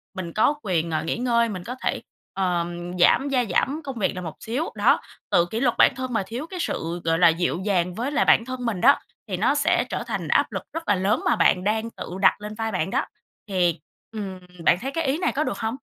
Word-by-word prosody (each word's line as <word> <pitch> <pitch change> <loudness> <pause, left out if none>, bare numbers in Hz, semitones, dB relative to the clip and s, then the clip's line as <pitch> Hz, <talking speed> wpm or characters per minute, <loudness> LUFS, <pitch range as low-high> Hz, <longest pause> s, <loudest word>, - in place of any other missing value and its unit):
mình 175 -3 -5
có 220 +7 +3
quyền, 170 -4 0
ờ, 155 - -1
nghỉ 165 - -2
ngơi, 235 -2 +2
mình 185 -4 -5
có 250 - -6
thể, - - -1 0.3
ờm, 175 -1 -2
giảm 270 +10 +4
gia 255 -3 +2
giảm 285 - 0
công 265 -5 -6
việc 190 - 0
lại 180 - -4
một 160 - -6
xíu. 255 +9 -3
Đó, - - +4 0.3
tự 170 - +4
kỷ 220 +6 -4
luật 245 -2 +2
bản - - +5
thân 255 -1 -4
mà 210 -4 +1
thiếu 245 +9 -5
cái 365 +1 -7
sự 170 - -3
gọi 165 0 +1
là 175 - +7
dịu 170 +1 +1
dàng 180 -3 +1
với 250 +7 -2
lại - - +2
bản 230 - +5
thân 255 -1 -5
mình 210 -6 -2
đó, 280 +3 +6 0.3
thì - - -3
nó - - +2
sẽ - - +2
trở - - -3
thành - - -3
áp - - +2
lực - - -4
rất 330 0 -5
là 205 - +4
lớn 190 +3 +1
mà - - +3
bạn 180 - +3
đang 220 +3 0
tự - - -8
đặt 205 - +4
lên 210 +1 -6
vai 225 0 -2
bạn 190 -1 -1
đó. - - 0 0.4
Thì, 175 -3 +1 0.3
ừm, 195 -4 -6 0.2
bạn 175 - +5
thấy 270 - -3
cái 330 +3 -1
ý 270 +3 +1
này 360 - 0
có 300 - 0
được 200 - -3
hông? 225 +2 -2
210 Hz, 255 wpm, -24 LUFS, 180-250 Hz, 0.4 s, là